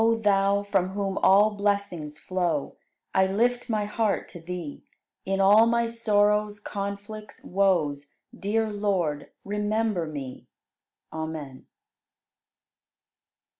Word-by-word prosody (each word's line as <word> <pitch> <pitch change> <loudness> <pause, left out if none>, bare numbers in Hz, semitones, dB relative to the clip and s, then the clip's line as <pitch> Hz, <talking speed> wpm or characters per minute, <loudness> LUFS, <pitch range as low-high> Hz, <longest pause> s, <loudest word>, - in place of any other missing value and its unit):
67. 230 0 +4
O - - -9
Thou, 200 0 +3
from 195 -2 0
whom 195 -1 -2
all 205 +3 +5
blessings 200 -7 -2
flow, 175 -6 -2 0.4
I 190 0 +4
lift 240 +6 0
my 215 -2 0
heart 210 0 -1
to 175 - -10
Thee; 170 -3 -6 0.4
In 195 0 -1
all 205 +4 +6
my 235 0 +2
sorrows, 210 -2 +1
conflicts, 205 +1 -6
woes, 160 -7 +1 0.2
Dear 220 +2 -1
Lord, 190 -8 -1 0.2
remember 210 -3 -1
me. 140 -4 -7 0.7
Amen. 160 -4 -6
200 Hz, 110 wpm, -26 LUFS, 175-210 Hz, 0.7 s, all